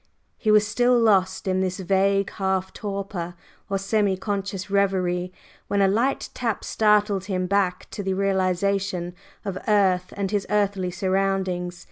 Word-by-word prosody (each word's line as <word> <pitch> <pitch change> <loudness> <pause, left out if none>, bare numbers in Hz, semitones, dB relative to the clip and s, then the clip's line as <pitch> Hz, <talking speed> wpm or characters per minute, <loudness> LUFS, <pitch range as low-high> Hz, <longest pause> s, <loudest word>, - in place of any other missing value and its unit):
He 215 - -2
was 210 0 +6
still 245 +3 +3
lost 190 -4 +2
in 185 0 +1
this 185 0 -1
vague 195 +1 +1
half 190 -1 -1
torpor 195 -4 -5 0.3
or 195 - 0
semi 200 -1 +1
conscious 195 -1 -3
reverie, 185 -3 +1 0.4
when 200 - 0
a 195 - +5
light 235 +8 0
tap 230 -4 -2
startled 210 -3 +2
him 185 -2 -1
back 195 -1 0
to - - -5
the 190 -1 -1
realization 190 -1 0 0.3
of 190 -2 -3
earth 190 -4 +2
and 200 -1 -2
his 205 -2 -1
earthly 200 -3 +1
surroundings. 185 -1 -1
195 Hz, 145 wpm, -24 LUFS, 185-205 Hz, 0.4 s, was